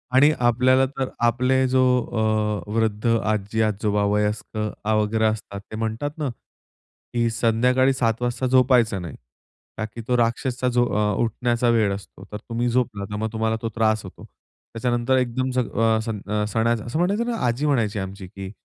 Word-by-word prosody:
आणि 145 Hz, +3 st, +6 dB
आपल्याला 125 Hz, +2 st, +4 dB
तर 130 Hz, -1 st, -1 dB, 0.2 s
आपले 130 Hz, +2 st, +2 dB
जो 130 Hz, 0 st, +3 dB, 0.8 s
अ, -, -, -14 dB
वृद्ध 110 Hz, -1 st, 0 dB, 0.2 s
आजी-आजोबा 105 Hz, 0 st, 0 dB
वयस्कर 105 Hz, 0 st, -1 dB
आ, 110 Hz, +1 st, +1 dB
वगैरे 110 Hz, +1 st, +1 dB
असतात 105 Hz, -2 st, -2 dB
ते -, -, -5 dB
म्हणतात 115 Hz, +6 st, -2 dB
ना, 145 Hz, -4 st, -2 dB, 0.8 s
की 120 Hz, -1 st, +1 dB
संध्याकाळी 125 Hz, +3 st, +2 dB
7:00 115 Hz, -2 st, 0 dB
वाजता 120 Hz, +1 st, -1 dB
झोपायचं 125 Hz, -6 st, +3 dB
नाही. 85 Hz, -4 st, -7 dB, 0.6 s
का 110 Hz, -, -2 dB
की 115 Hz, +2 st, -9 dB
तो 125 Hz, -1 st, +2 dB
राक्षसचा 120 Hz, +2 st, 0 dB
जो 120 Hz, 0 st, +4 dB
अ, 105 Hz, -1 st, +1 dB
उठण्याचा 120 Hz, +1 st, 0 dB
वेळ 110 Hz, -4 st, +3 dB
असतो 100 Hz, -, -12 dB
तर 105 Hz, -, -4 dB
तुम्ही 120 Hz, +2 st, -2 dB
झोपला 115 Hz, -5 st, -1 dB
तर 105 Hz, -, -5 dB
मग 110 Hz, +1 st, -2 dB
तुम्हाला 110 Hz, 0 st, 0 dB
तो 115 Hz, -, -2 dB
त्रास 110 Hz, -1 st, +1 dB
होतो. 95 Hz, -, -11 dB, 0.5 s
त्याच्यानंतर 120 Hz, +2 st, +1 dB
एकदम 130 Hz, +1 st, 0 dB
सग 125 Hz, -2 st, -1 dB
अ, 110 Hz, -1 st, +3 dB
सग 105 Hz, -2 st, -5 dB
अ, 105 Hz, 0 st, +1 dB
सणा 115 Hz, +2 st, +1 dB
असं 120 Hz, +6 st, -2 dB
म्हणायचं 200 Hz, +6 st, +1 dB
ना -, -, -2 dB
आजी 125 Hz, +6 st, -1 dB
म्हणायची 115 Hz, -8 st, +1 dB
आमची, 95 Hz, 0 st, -6 dB
की 95 Hz, +1 st, -8 dB
115 Hz, 170 wpm, -23 LUFS, 105-125 Hz, 0.8 s, आणि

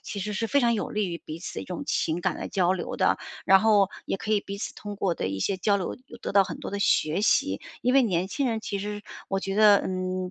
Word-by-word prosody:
其 205 Hz, -, -6 dB
实 210 Hz, +2 st, -3 dB
是 225 Hz, +2 st, -1 dB
非 285 Hz, -, +3 dB
常 235 Hz, -1 st, +3 dB
有 210 Hz, -, -2 dB
利 210 Hz, -2 st, -1 dB
于 170 Hz, -1 st, -4 dB
彼 155 Hz, +1 st, -6 dB
此 175 Hz, -, -7 dB
的 -, -, -4 dB
一 -, -, -7 dB
种 180 Hz, -, -5 dB
情 160 Hz, +2 st, 0 dB
感 -, -, 0 dB
的 -, -, -5 dB
交 185 Hz, -1 st, +2 dB
流 185 Hz, -, -4 dB
的。 -, -, +2 dB, 0.3 s
然 190 Hz, 0 st, +6 dB
后 210 Hz, -3 st, +4 dB, 0.2 s
也 -, -, -2 dB
可 215 Hz, -, -6 dB
以 210 Hz, -, +3 dB
彼 200 Hz, 0 st, -7 dB
此 205 Hz, -, -5 dB
通 205 Hz, -1 st, -7 dB
过 190 Hz, -3 st, 0 dB
的 -, -, -3 dB
一 95 Hz, 0 st, -3 dB
些 195 Hz, -, 0 dB
交 200 Hz, +2 st, +2 dB
流 190 Hz, -, -3 dB
有 235 Hz, -, -11 dB
得 -, -, -5 dB
到 200 Hz, 0 st, +6 dB
很 -, -, -6 dB
多 -, -, -6 dB
的 200 Hz, -, -3 dB
学 175 Hz, -3 st, +2 dB
习。 100 Hz, -, +2 dB, 0.2 s
因 250 Hz, +2 st, +2 dB
为 275 Hz, -, +7 dB
年 185 Hz, -6 st, +1 dB
轻 275 Hz, +5 st, -1 dB
人 225 Hz, -1 st, -1 dB
其 200 Hz, -2 st, -3 dB
实 205 Hz, +1 st, -4 dB
是 -, -, -13 dB, 0.3 s
我 195 Hz, 0 st, -1 dB
觉 195 Hz, 0 st, -3 dB
得， 210 Hz, -1 st, +7 dB
嗯， 185 Hz, 0 st, -3 dB
200 Hz, 310 characters per minute, -26 LUFS, 185-210 Hz, 0.3 s, 为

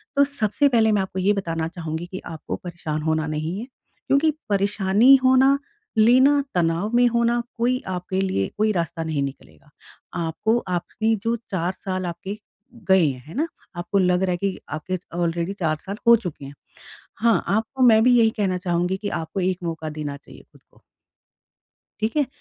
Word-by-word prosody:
तो 280 Hz, -, +6 dB
सबसे 280 Hz, -1 st, +1 dB
पहले 225 Hz, -4 st, +3 dB
मैं 205 Hz, -2 st, +2 dB
आपको 190 Hz, 0 st, -4 dB
ये 195 Hz, +3 st, +3 dB
बताना 165 Hz, -5 st, -2 dB
चाहूँगी 165 Hz, -1 st, -5 dB
कि 190 Hz, -, -5 dB
आपको 160 Hz, -1 st, -6 dB
परेशान 165 Hz, -3 st, -4 dB
होना 160 Hz, 0 st, 0 dB
नहीं 155 Hz, +4 st, -3 dB
है। 230 Hz, -, -5 dB, 0.4 s
क्योंकि 290 Hz, +3 st, +3 dB, 0.2 s
परेशानी 200 Hz, +5 st, +4 dB
होना 260 Hz, +2 st, +5 dB, 0.4 s
लेना, 260 Hz, +6 st, +5 dB
तनाव 170 Hz, +4 st, +1 dB
में 245 Hz, 0 st, +5 dB
होना 235 Hz, 0 st, +1 dB, 0.2 s
कोई 250 Hz, +2 st, +1 dB
आपके 185 Hz, +1 st, -2 dB
लिए 100 Hz, -, 0 dB
कोई 215 Hz, +1 st, +2 dB
रास्ता 170 Hz, -3 st, -2 dB
नहीं 155 Hz, -3 st, -2 dB
निकलेगा। 80 Hz, -, -9 dB, 0.5 s
आपको 210 Hz, +8 st, 0 dB
आपने 215 Hz, +5 st, -1 dB
जो 230 Hz, +1 st, +1 dB, 0.2 s
4 180 Hz, -1 st, -1 dB
साल 185 Hz, -1 st, -3 dB
आपके 180 Hz, +4 st, -5 dB, 0.5 s
गए 190 Hz, -3 st, +6 dB
हैं, 130 Hz, -3 st, -4 dB
है 160 Hz, -, -10 dB
ना? 310 Hz, +5 st, 0 dB, 0.3 s
आपको 175 Hz, +3 st, -2 dB
लग 180 Hz, 0 st, +2 dB
रहा 185 Hz, -, +1 dB
है 175 Hz, -, 0 dB
कि 195 Hz, +1 st, -2 dB
आपके 170 Hz, +5 st, -3 dB, 0.2 s
ऑलरेडी 170 Hz, +2 st, -1 dB
4 155 Hz, -3 st, 0 dB
साल 200 Hz, +2 st, -6 dB
हो 235 Hz, -, +9 dB
चुके 175 Hz, -10 st, -6 dB
हैं। 140 Hz, -, -9 dB, 0.7 s
हाँ, 230 Hz, 0 st, +3 dB
आपको 225 Hz, +6 st, -1 dB
मैं 220 Hz, -3 st, +6 dB
भी 245 Hz, 0 st, +5 dB
यही 225 Hz, -1 st, +5 dB
कहना 190 Hz, -3 st, 0 dB
चाहूँगी 180 Hz, 0 st, -1 dB
कि 205 Hz, +1 st, -4 dB
आपको 160 Hz, +5 st, -5 dB
एक 185 Hz, 0 st, 0 dB
मौका 160 Hz, -2 st, -4 dB
देना 150 Hz, -2 st, -5 dB
चाहिए -, -, -16 dB
खुद -, -, -21 dB
को। -, -, -25 dB, 1.2 s
ठीक 220 Hz, +6 st, -1 dB
है? 295 Hz, -2 st, +3 dB
190 Hz, 180 wpm, -23 LUFS, 165-225 Hz, 1.2 s, हो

